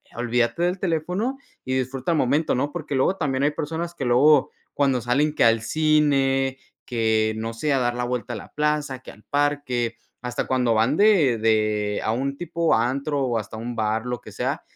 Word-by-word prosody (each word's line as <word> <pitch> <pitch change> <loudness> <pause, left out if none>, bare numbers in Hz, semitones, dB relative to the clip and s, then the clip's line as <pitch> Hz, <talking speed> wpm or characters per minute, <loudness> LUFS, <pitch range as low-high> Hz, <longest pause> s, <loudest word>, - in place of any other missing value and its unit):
olvídate 120 +6 0
del 180 +2 +1
teléfono 185 - -1 0.3
y 130 - -2
disfruta 130 +3 -2
el 165 - +2
momento, 145 +5 +1
¿no? 140 +3 -1
Porque 155 -4 -5
luego 135 +8 +2
también 135 -6 -1
hay 145 - +4
personas 165 +3 -4
que 135 - -4
luego, 135 +4 +4 0.2
cuando 135 -3 +2
salen 140 +6 +1
que - - +2
al 115 -1 +4
cine, 135 -1 +2 0.3
que 110 -2 +1
no 115 +1 -4
sé, 145 +5 0
a 135 - +2
dar 120 -1 0
la 125 - -2
vuelta 120 -3 -3
a - - -4
la - - -12
plaza, 150 -3 -1
que - - -13
al 105 - -19
parque, 140 -5 -1 0.2
hasta 125 -1 -3
cuando 125 -3 +1
van 115 +7 +2
de 175 - +4
de 105 -2 +1
a 110 - 0
un 140 +4 -2
tipo 170 -1 0
antro 140 +5 0
o 120 -3 0
hasta 110 +1 -8
un 120 +2 -5
bar, 110 +1 -1
lo 125 -1 -4
que - - -12
sea, - - -2
130 Hz, 200 wpm, -23 LUFS, 120-150 Hz, 0.3 s, hay